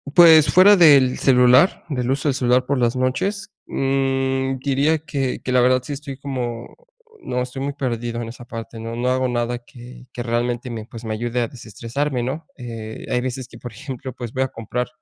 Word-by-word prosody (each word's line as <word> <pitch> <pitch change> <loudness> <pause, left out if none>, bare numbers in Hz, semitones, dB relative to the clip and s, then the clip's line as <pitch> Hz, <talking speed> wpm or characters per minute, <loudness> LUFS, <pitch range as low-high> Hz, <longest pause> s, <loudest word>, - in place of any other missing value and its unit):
Pues 160 -3 +8
fuera 195 +3 +8
del 140 -8 +6
celular, 125 +5 +4
del 125 -3 -1
uso 135 +2 -1
del 140 - +2
celular 125 0 +2
por 140 +2 0
las 120 -1 +1
noches, 195 +12 -1 0.2
mm 135 0 0
diría 140 +4 +1
que 140 -4 -3
que 130 - -4
la 125 - +5
verdad 130 +1 +3
sí 145 +3 -6
estoy 140 -1 -7
como, 125 -4 -5 0.5
no, 125 - -2
estoy 125 +2 -5
muy 140 +1 -2
perdido 120 -4 -3
en 115 - -5
esa 120 +2 -10
parte. 115 -1 -8
No, 115 +1 -5
no 120 +1 -1
hago 130 0 +1
nada 120 0 -1
que 120 +1 -14
que 120 - -6
realmente 120 +1 -2
me, 115 -2 -5
pues 115 -1 -10
me 110 - -2
ayude 120 +2 -2
a 120 - 0
desestresarme, 125 +4 -4
¿no? 135 +7 -4
Eh, 115 -3 -7
hay 125 - +1
veces 130 0 -4
que - - -14
por 120 - -8
ejemplo, 130 +2 -7
pues 120 -2 -7
voy 130 0 +1
a 130 - -3
comprar, 120 +2 -4
125 Hz, 205 wpm, -21 LUFS, 120-135 Hz, 0.5 s, Pues